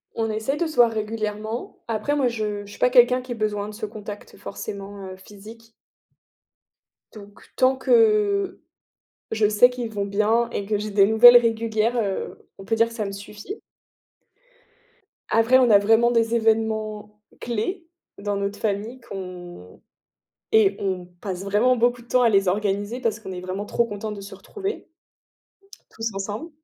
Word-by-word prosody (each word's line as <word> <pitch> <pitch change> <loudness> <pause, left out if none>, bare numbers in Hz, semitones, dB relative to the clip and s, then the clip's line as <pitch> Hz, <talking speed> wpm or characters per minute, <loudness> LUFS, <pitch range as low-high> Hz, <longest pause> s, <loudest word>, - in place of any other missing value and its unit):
On 225 -1 -1
essaie 220 +7 -2
de 345 - 0
se 315 - -8
voir 240 -2 +5
régulièrement. 215 +1 -4
Après 230 +6 -1
moi 270 -3 +2
je 210 -3 -4
je 200 - -13
suis - - -13
pas 250 - +4
quelqu'un 250 0 +5
qui 250 0 -10
ait - - -2
besoin 210 -2 -2
de - - -9
ce 215 0 -4
contact 210 -1 -9
forcément, 200 -1 -7
heu, 185 - -8
physique. 220 +4 -14 1.4
Donc 205 -1 -14
tant 260 +1 +3
que 415 - +2 0.7
je 220 -1 +2
sais 215 +4 +5
qu'ils 245 -3 -5
vont 200 -1 -2
bien 215 +4 +1
et 200 - -3
que 210 0 0
j'ai 210 +1 -4
des 200 -1 +5
nouvelles 240 +3 +9
régulières, 230 0 0
heu, 200 -4 -3
on 195 - -11
peut 225 - 0
dire 230 +1 +3
que 230 - -12
ça 215 -3 -3
me 195 - -4
suffit. 210 - -9 1.7
Après, 230 +3 +5
on 245 -2 +4
a 205 - +8
vraiment 225 +4 +4
des 230 -1 +1
événements 220 -2 -1 0.2
clés 325 - -3 0.3
dans 205 0 -3
notre 200 +1 -3
famille 220 +4 -3
qu'on 180 - -10 0.7
et 200 -3 +4
on 185 -2 -2
passe 190 -1 -5
vraiment 220 +6 +2
beaucoup 240 +1 +1
de 235 - -22
temps 250 -1 +3
à 235 - +5
les 195 -3 +3
organiser 205 +4 -1
parce 230 -2 -1
qu'on 190 -3 -8
est 180 - -6
vraiment 185 +2 -5
trop 235 +2 0
contents 210 0 -5
de 200 - -8
se 200 - -10
retrouver 410 0 -6 1.0
tous 225 -1 -4
ensemble. 205 - -5
220 Hz, 170 wpm, -23 LUFS, 205-235 Hz, 1.7 s, nouvelles